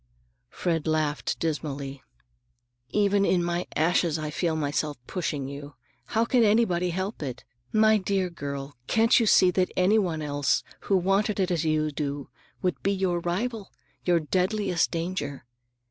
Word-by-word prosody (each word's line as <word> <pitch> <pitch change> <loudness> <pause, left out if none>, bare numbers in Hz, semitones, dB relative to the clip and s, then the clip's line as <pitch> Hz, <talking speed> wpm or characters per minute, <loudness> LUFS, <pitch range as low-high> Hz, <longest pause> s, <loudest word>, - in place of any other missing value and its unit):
Fred 165 -3 -1
laughed 155 -2 0
dismally. 140 -4 -3 0.9
"Even 205 -1 +2
in 180 -3 +2
my 175 +1 -1
ashes 165 0 +2
I 155 -1 -4
feel 165 +1 0
myself 150 0 -1
pushing 150 -6 -3
you! 140 0 -8 0.3
How 225 0 +1
can 240 0 +3
anybody 205 -5 +3
help 190 +4 -3
it? 130 -4 -5 0.3
My 215 0 +5
dear 190 -2 -1
girl, 140 -3 -6
can't 225 +3 +4
you 230 - +2
see 185 -3 +6
that 180 0 +1
anybody 180 -5 +2
else 145 -1 +1 0.3
who 195 - +5
wanted 195 +3 +1
it 185 -1 +1
as 165 -2 0
you 155 -1 +1
do 145 -1 -4 0.3
would 180 -1 -1
be 195 - +1
your 190 -3 0
rival, 200 +5 -3 0.3
your 175 -1 +3
deadliest 185 +3 +1
danger? 165 -6 -4
175 Hz, 145 wpm, -26 LUFS, 150-195 Hz, 0.9 s, see